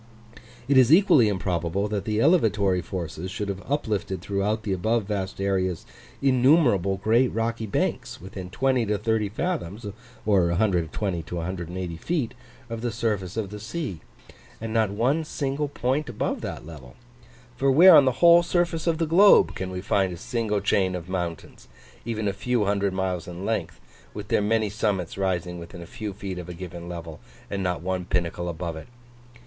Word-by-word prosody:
It 135 -1 +5
is 130 +1 +5
equally 155 - +6
improbable 90 0 -1
that 100 -2 -2
the 105 -1 -1
elevatory 105 - +3
forces 85 -1 -5
should 100 +2 -4
have 100 0 -4
uplifted 105 - -1
throughout 100 +4 -1
the 100 -3 -1
above 110 +5 0
vast 95 -2 -4
areas, 95 -3 -1 0.4
innumerable 125 - +4
great 115 +6 +3
rocky 115 -1 -2
banks 100 - -2
within 95 0 -8
20 130 +2 +1
to 105 0 +1
30 110 0 0
fathoms, 115 - -3 0.4
or 100 -5 +3
120 90 0 0
to 90 - -8
180 85 0 -4
feet, 145 - -2 0.3
of 115 -1 -5
the 120 0 -1
surface 105 -4 -2
of 105 -3 -3
the 105 - -7
sea, 110 - -5 0.6
and 115 0 -5
not 110 -3 +2
one 125 +10 +1
single 145 -1 -2
point 135 +1 -1
above 115 - -2
that - - -6
level; 70 -6 -11 0.6
for 135 +3 +1
where 175 +6 +9
on 145 - +8
the 130 - +2
whole 170 0 +8
surface 170 -1 0
of 165 -1 +2
the 165 - +1
globe 185 +6 +6
can 95 0 -4
we 90 0 -5
find 95 -1 +1
a 85 - -6
single 110 0 -2
chain 95 -2 +1
of 90 0 -7
mountains, 85 -3 -5 0.4
even 110 -2 -2
a 100 - 0
few 120 +2 0
hundred 100 0 +1
miles 95 -2 -2
in 90 +2 -7
length, 90 -7 -2 0.4
with 105 0 -7
their - - +2
many 110 +1 +1
summits 100 -4 -2
rising 90 -2 -2
within 85 +1 -9
a - - -10
few 105 +4 -6
feet 95 -2 -6
of 90 0 -8
a 90 - -6
given 85 -1 -8
level, 85 -3 -7 0.3
and 100 -1 -2
not 90 -3 -2
one 95 0 -2
pinnacle 85 0 -2
above 85 0 -4
it? 80 - -9
100 Hz, 175 wpm, -25 LUFS, 90-115 Hz, 0.6 s, where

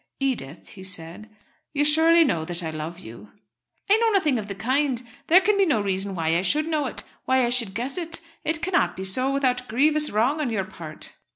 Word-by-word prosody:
"Edith," 235 - -3
he 190 - -12
said, 185 +2 -5 0.4
"you 290 0 +1
surely 325 +3 +5
know 170 - 0
that 175 +1 -2
I 160 - -3
love 155 +2 -6
you." 110 - -12 0.6
"I 405 +3 +5
know 455 0 +2
nothing 315 - +2
of 205 - -6
the 200 - -6
kind. 260 +4 0 0.3
There 360 +4 +6
can 405 +1 +1
be 390 - +5
no 270 -9 +2
reason 195 -1 -1
why 165 -2 -1
I 170 - +2
should 295 +12 +1
know 305 -4 -1
it, - - -6 0.2
why 260 -1 +3
I - - 0
should 230 -6 +1
guess 260 +8 -2
it. 330 -1 -2 0.2
It 320 +1 -1
cannot 370 0 +1
be 190 - -6
so 255 +8 +2
without 250 -2 0
grievous 300 +6 +3
wrong 250 +9 +1
on 280 - -1
your 200 -4 -2
part." 165 -6 -7
250 Hz, 215 wpm, -24 LUFS, 190-305 Hz, 0.6 s, There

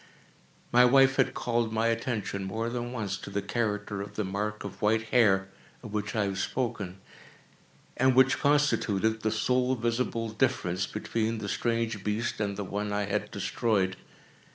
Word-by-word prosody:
My 125 +1 +7
wife 135 +2 +5
had 130 - +2
called 120 -2 0
my 110 +1 0
attention, 110 -4 -2
more 110 +4 -2
than 120 0 -3
once, 105 -6 -3
to - - -9
the 100 0 -2
character 105 -2 -2
of 100 +1 -8
the 105 - -1
mark 105 +3 -3
of 100 -2 -8
white 110 +1 +1
hair, 95 -6 +4 0.3
of 110 -3 -8
which 105 0 -2
I 105 - +2
have 100 -1 -2
spoken, 100 -6 -2 1.0
and 130 0 +3
which 130 +2 +5
constituted 110 -7 +2
the 110 - +1
sole 125 +4 +1
visible 115 -1 -1
difference 105 -6 0
between 110 +1 -2
the 105 -1 -5
strange 115 -1 -1
beast 105 +3 -2
and 100 -1 -1
the 105 - -2
one 105 +2 -3
I 105 0 0
had 105 0 -2
destroyed. 95 -5 0
110 Hz, 165 wpm, -28 LUFS, 100-120 Hz, 1.0 s, My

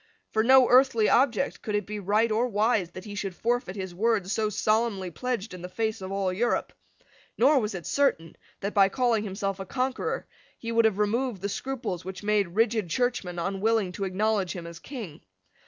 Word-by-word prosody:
For 220 - +2
no 260 +1 +7
earthly 250 -4 +5
object 260 +1 +2
could 210 -3 -3
it 205 -2 0
be 210 +1 -5
right 210 +4 +2
or 230 +3 +2
wise 210 -4 +1
that 185 +2 -10
he 205 - -7
should 195 -2 -4
forfeit 235 -4 -1
his 190 -3 -5
word 205 -1 +1
so 215 -1 +1
solemnly 215 -3 0
pledged 230 +3 -3
in 180 - -8
the 180 - -6
face 220 +2 -2
of 190 0 -6
all 195 -2 -1
Europe. 240 +6 0 0.6
Nor 285 -1 +5
was 210 -3 -2
it 175 - -6
certain 170 - 0 0.3
that, 200 +1 -3
by 195 -1 +5
calling 235 -1 +1
himself 195 -1 -3
a 195 - -5
conqueror, 260 +3 -2 0.3
he 230 - -5
would 230 0 +4
have 215 -3 +2
removed 210 0 0
the 200 - -1
scruples 235 -7 -4
which 190 +2 -7
made 210 -2 +2
rigid 220 -4 +1
Churchmen 240 -5 -1
unwilling 195 +2 0
to 195 +2 -4
acknowledge 195 0 0
him 175 -2 -6
as 170 -1 -9
King. 200 - -8
210 Hz, 195 wpm, -27 LUFS, 190-235 Hz, 0.6 s, no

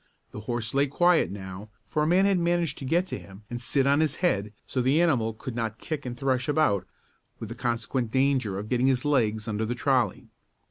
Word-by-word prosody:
The - - -7
horse 115 +1 -3
lay 140 +1 +3
quiet 175 +5 +3
now, 95 +1 -8 0.2
for 150 +8 -1
a 150 - +2
man 185 +4 +4
had 195 -2 +3
managed 170 -3 0
to 135 - -6
get 170 +7 +2
to - - -5
him 100 +2 -14
and 120 0 -4
sit 135 +2 +1
on 140 +1 +4
his 155 -3 +1
head, 105 - 0
so 130 - -1
the 135 +5 +3
animal 130 -10 +2
could 115 +2 -7
not 115 -2 -2
kick 150 0 -5
and 120 0 -5
thresh 135 +1 0
about 105 - +2 0.5
with - - -7
the - - -5
consequent 120 0 -2
danger 130 -6 +1
of 105 +2 -5
getting 125 +2 +2
his 130 -1 +1
legs 110 -6 +1
under 110 0 -1
the 120 +3 -2
trolley. 125 -5 0
130 Hz, 220 wpm, -27 LUFS, 110-145 Hz, 0.5 s, man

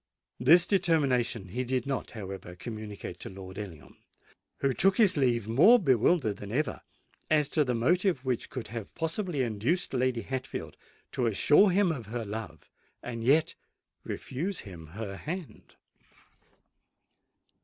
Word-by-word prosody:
This 165 +7 +6
determination 140 - +1
he 125 +7 -2
did 125 -1 -1
not, 135 -2 -3
however, 95 -3 -7
communicate 110 0 -7
to - - -6
Lord 95 0 -9
Ellingham, 80 -9 -9 0.6
who 135 -1 +1
took 195 +8 +3
his 210 -5 +5
leave 120 -6 +1
more 155 - +7
bewildered 130 - +2
than 100 0 -8
ever 145 +6 -1 0.5
as 150 -2 +3
to 155 - +2
the 125 -3 -1
motive 170 - +1
which 125 -3 -1
could 125 -6 -6
have 115 -2 -7
possibly 165 -3 -1
induced 120 - -1
Lady 125 -2 0
Hatfield 130 -1 -5 0.4
to 125 -4 0
assure 150 - +5
him 190 -1 +3
of 125 -9 -5
her 115 +1 -4
love 105 +1 -7 0.4
and 115 -2 -5
yet 150 +6 +3 0.5
refuse 170 +9 -4
him 85 -6 -10
her 95 +3 -6
hand. 175 - -7
125 Hz, 140 wpm, -29 LUFS, 110-160 Hz, 0.6 s, more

